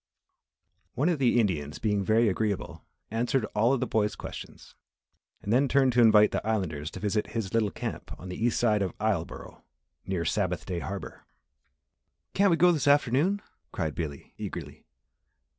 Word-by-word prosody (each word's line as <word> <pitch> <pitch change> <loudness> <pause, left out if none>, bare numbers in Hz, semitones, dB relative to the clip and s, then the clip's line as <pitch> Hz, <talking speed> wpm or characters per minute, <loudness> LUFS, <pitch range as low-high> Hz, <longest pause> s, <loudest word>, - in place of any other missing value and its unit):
One 145 +8 +2
of 165 -5 0
the 125 -2 +3
Indians 75 -10 -1
being 105 -2 0
very 110 +4 +3
agreeable 105 0 -2 0.3
answered 120 +2 0
all 115 +4 +3
of 135 -2 +1
the - - +1
boy's 105 -3 0
questions, - - -9 0.7
and 105 - -1
then 135 +3 +4
turned 135 -1 +3
to 120 - +4
invite 105 -2 +6
the - - -2
Islanders 90 -9 -2
to 95 - -9
visit 105 +2 -1
his 100 -4 -3
little 110 -2 +2
camp - - -6
on 90 - -9
the 90 +4 -5
east 120 -1 +2
side 110 -3 +2
of 95 - -3
Isleboro, 105 -6 -3 0.5
near 90 -3 -1
Sabbath 90 0 -1
Day 90 -2 -3
Harbour. 100 +2 -7 1.1
"Can't 200 +1 +4
we 170 - +3
go 180 +1 +6
this 155 -4 0
afternoon?" 145 - +3 0.3
cried 80 -4 -2
Billy, 75 -4 -6
eagerly. - - -7
110 Hz, 165 wpm, -28 LUFS, 95-125 Hz, 1.1 s, invite